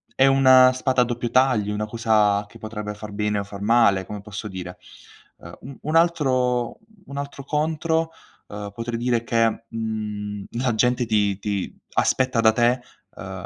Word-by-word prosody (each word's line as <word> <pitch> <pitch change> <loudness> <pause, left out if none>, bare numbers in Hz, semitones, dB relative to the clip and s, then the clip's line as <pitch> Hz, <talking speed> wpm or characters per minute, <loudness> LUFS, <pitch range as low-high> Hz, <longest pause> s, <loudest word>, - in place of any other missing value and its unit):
è 135 - +5
una 130 -1 +6
spada 130 0 +1
a - - +3
doppio 120 0 -3
taglio, 125 -6 +2
una 105 +1 -2
cosa 105 -2 +2
che - - -14
potrebbe 105 -1 -6
far 105 0 -9
bene 105 0 -1
o - - -2
far 100 0 -10
male, 100 -3 +3
come 105 - -7
posso 105 +1 -7
dire. 90 -1 -7 0.6
Uhm, - - -12
un 135 0 -10
un 155 +2 -2
altro 130 -8 +1 0.3
un 140 - -10
altro 140 -1 -6
contro, 160 +2 0 0.4
uhm, 105 0 -7
potrei 115 +1 -4
dire 120 -1 0
che, 115 -1 +1
mhmm, 105 -2 -4 0.2
la 125 -3 0
gente 125 +2 +2
ti 105 -3 +1
ti 100 -2 -3 0.2
aspetta 130 -2 +1
da 110 - +6
te, 120 +2 +2 0.3
uhm - - -8
115 Hz, 170 wpm, -23 LUFS, 105-130 Hz, 0.6 s, una